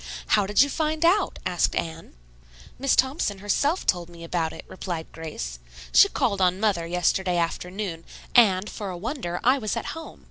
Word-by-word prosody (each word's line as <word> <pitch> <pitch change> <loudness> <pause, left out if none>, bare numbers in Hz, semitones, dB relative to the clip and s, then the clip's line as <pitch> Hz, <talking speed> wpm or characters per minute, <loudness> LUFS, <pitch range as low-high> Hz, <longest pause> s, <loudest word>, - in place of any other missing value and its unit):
"How 205 -2 +3
did 205 +6 +5
you - - 0
find 315 +1 0
out?" 380 +4 +3
asked 180 -2 +1
Anne. 165 - -4 0.6
"Miss 275 0 +3
Thompson 260 -6 +1
herself 280 - 0
told 175 -2 0
me 170 -1 -12
about 165 -1 -1
it," - - -10
replied 175 -4 -6
Grace. - - -6 0.3
"She 400 - +8
called 225 - 0
on 185 0 +3
mother 195 -6 +1
yesterday 180 +1 +1
afternoon, 175 +1 -3 0.3
and, 205 -5 +5
for 205 -3 -6
a 180 - -5
wonder, 190 - -4
I 260 +3 +4
was 215 -1 -2
at - - -3
home. 325 0 -9
190 Hz, 175 wpm, -25 LUFS, 170-250 Hz, 0.6 s, She